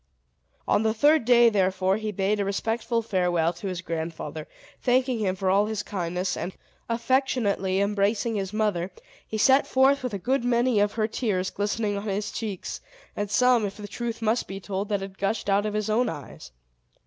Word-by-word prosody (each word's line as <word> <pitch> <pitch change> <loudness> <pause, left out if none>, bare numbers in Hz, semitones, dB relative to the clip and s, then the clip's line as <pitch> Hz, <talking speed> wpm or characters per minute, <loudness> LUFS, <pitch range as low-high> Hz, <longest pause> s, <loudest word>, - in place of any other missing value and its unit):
On - - +3
the 220 0 +1
third 295 +3 +4
day, 240 -1 +6
therefore, 190 -1 +1
he 215 -1 -3
bade 200 +1 0
a - - +2
respectful 225 +3 -1
farewell 180 -5 +1
to 195 - -7
his 180 -2 -3
grandfather, 160 -2 -5 0.3
thanking 255 -1 +2
him 190 -3 0
for 190 -1 0
all 200 +2 +3
his 215 -1 -3
kindness; 180 -1 -2
and, 185 - -4
after - - -32 0.3
affectionately 230 -7 +1
embracing 205 +3 +1
his 195 -3 -2
mother, 210 -5 0 0.4
he 220 - -3
set 265 +6 +4
forth 270 +2 +4
with 250 -5 -3
a - - -1
good 250 +7 0
many 240 -1 +2
of 205 0 +2
her 215 -1 0
tears 205 -5 -1
glistening 205 0 -1
on 210 - -7
his 205 +1 -2
cheeks, 210 -5 -5 0.3
and 205 0 -2
some, 250 +1 +4
if 200 -1 -4
the 210 -1 -7
truth 230 +1 -5
must 225 +2 +1
be 195 0 -6
told, 195 +1 -4
that 205 -2 0
had 195 0 -8
gushed 205 +2 -1
out 205 +2 +2
of 210 - -3
his 215 0 -1
own 225 +3 +2
eyes. 145 - -9
210 Hz, 195 wpm, -26 LUFS, 195-230 Hz, 0.4 s, day